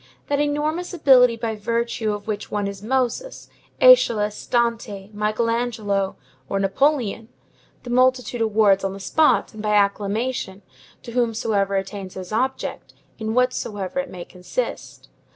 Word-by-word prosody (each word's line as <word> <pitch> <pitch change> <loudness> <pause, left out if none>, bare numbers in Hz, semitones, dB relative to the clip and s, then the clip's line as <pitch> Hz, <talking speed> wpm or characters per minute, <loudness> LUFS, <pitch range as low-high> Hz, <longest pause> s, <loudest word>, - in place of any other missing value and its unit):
That 285 0 +1
enormous 305 +5 -1
ability 250 -6 +6
by 230 -1 -3
virtue 230 0 -1
of 205 0 -5
which 210 -1 -4
one 205 -1 -2
is 200 -1 -5
Moses, 260 - -2 0.3
Æschylus, 225 - +4
Dante, 230 -4 -1
Michael 215 +2 0
Angelo, 220 -5 -1 0.3
or 195 - 0
Napoleon, 225 +1 0 0.5
the 245 - -6
multitude 255 -1 +2
awards 210 -3 +3
on 195 0 -1
the 195 - -8
spot, 305 +10 +2
and 215 - -8
by 210 0 +1
acclamation, 205 0 0 0.4
to 235 - -8
whomsoever 225 -4 0
attains 195 -1 -4
his 185 0 -7
object, 260 +4 -2 0.2
in 220 0 -3
whatsoever 230 -4 -1
it 275 0 -3
may 175 -2 -8
consist. 185 - -5
220 Hz, 135 wpm, -22 LUFS, 200-250 Hz, 0.5 s, ability